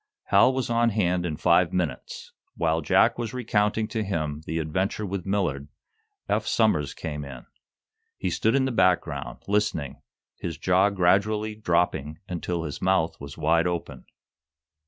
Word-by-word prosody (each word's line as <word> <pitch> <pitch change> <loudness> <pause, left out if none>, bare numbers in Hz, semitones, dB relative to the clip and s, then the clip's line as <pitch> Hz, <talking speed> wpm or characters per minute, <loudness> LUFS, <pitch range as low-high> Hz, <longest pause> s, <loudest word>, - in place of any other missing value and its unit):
Hal - - +6
was 130 -2 -2
on 115 0 +2
hand 90 -5 0
in 75 -3 -4
five 85 +2 +3
minutes. 85 -8 -4 0.3
While 80 0 +1
Jack 80 - +3
was 120 +1 -4
recounting 110 -2 0
to 110 0 -2
him 75 -6 -3
the 80 - -2
adventure 95 +7 -1
with 95 -1 -4
Millard, 90 -9 -1 0.6
Eph - - 0
Somers 105 -11 +1
came 75 -2 -5
in. 70 -3 -9 0.7
He - - -2
stood 110 +4 +1
in 135 -1 +3
the 130 - -1
background, 90 - 0
listening, 100 -8 -1 0.4
his 85 -4 -4
jaw 90 +4 +3
gradually 100 +3 +1
dropping 85 -7 0
until 85 -1 -3
his 75 +1 -6
mouth 90 -5 +1
was 70 0 -9
wide 80 +2 +2
open. 85 -1 -4
90 Hz, 150 wpm, -26 LUFS, 80-105 Hz, 0.7 s, Hal